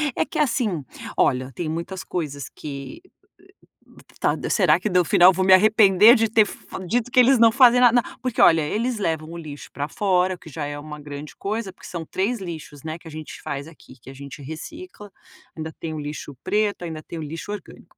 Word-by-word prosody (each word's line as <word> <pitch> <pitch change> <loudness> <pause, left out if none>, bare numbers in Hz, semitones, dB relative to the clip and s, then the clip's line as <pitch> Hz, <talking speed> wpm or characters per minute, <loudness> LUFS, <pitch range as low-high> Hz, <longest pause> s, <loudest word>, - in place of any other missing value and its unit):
é - - +1
que - - -5
assim, 230 - 0 0.3
olha, 130 0 +1
tem 165 +3 -4
muitas 170 +4 -5
coisas 145 -5 -4
que, 145 - -8
eh, - - -22 1.1
tá - - +1
será 175 -5 +4
que 210 - -2
no 180 -1 +3
final 180 +3 +6
vou 185 +1 0
me 190 - +7
arrepender 210 +2 +7
de 225 -2 +1
ter 220 0 +4
f - - -9 0.3
dito 245 +5 -1
que 250 - +4
eles 255 +2 +6
não 230 -1 +7
fazem 245 0 +6
nada? 245 0 +6
N - - -12
porque, 255 -3 -1
olha, 165 -1 +6
eles 225 +10 -1
levam 160 -4 -2
o 170 - -7
lixo 150 -3 -9
pra 145 0 -4
fora, 185 0 +1
que 165 - -14
já 150 0 -5
é 145 0 -5
uma 150 0 -9
grande 145 0 -9
coisa, 205 -1 -4
porque - - -13
são 170 -2 -5
3 210 +9 -1
lixos, 155 -5 -8
né, 160 +1 -5
que 165 - -14
a - - -9
gente 155 0 -9
faz 140 +2 -5
aqui, 155 -5 -16
que 130 - -13
a - - -9
gente 140 +1 -10
recicla, 205 - -9 0.4
ainda 160 -1 -6
tem 160 -1 -5
o 155 - -5
lixo 145 -1 -7
preto, 210 -3 0
ainda 160 -2 -6
tem 165 - -8
o - - -5
lixo 165 +7 -6
orgânico, 205 -4 -10
175 Hz, 215 wpm, -23 LUFS, 155-215 Hz, 1.1 s, me